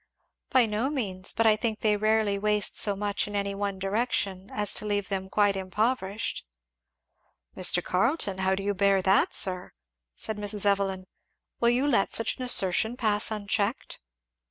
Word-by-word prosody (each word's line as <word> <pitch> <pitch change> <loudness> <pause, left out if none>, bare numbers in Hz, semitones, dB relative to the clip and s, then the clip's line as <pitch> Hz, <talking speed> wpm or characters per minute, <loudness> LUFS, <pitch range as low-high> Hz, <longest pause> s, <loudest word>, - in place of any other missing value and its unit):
"By 255 -2 +4
no 220 +5 -2
means! 195 -10 -2
but 225 - 0
I 215 -1 +6
think 220 -1 -3
they 210 -1 +2
rarely 215 -1 +1
waste 210 0 +1
so 205 -2 +2
much 205 +1 -2
in 205 - -7
any 200 0 -2
one 200 -1 -3
direction 195 -1 -2
as 210 -1 +1
to - - -1
leave 205 -1 -2
them 190 -1 -3
quite 205 0 +2
impoverished." 200 +2 -2 1.1
"Mr. 180 -1 +2
Carleton, 195 - -1
how 190 0 +1
do 195 - -5
you 205 +1 -1
bear 195 -1 +2
that, 190 +1 +3
sir?" 185 -1 +1 0.4
said 220 - -6
Mrs. 205 0 -2
Evelyn. 195 -2 0 0.5
"Will 235 - +3
you 250 +3 +1
let 235 -8 +2
such 225 - 0
an 255 - -5
assertion 220 0 +2
pass 215 -3 +2
unchecked?" 210 +1 -2
205 Hz, 165 wpm, -27 LUFS, 195-220 Hz, 1.1 s, I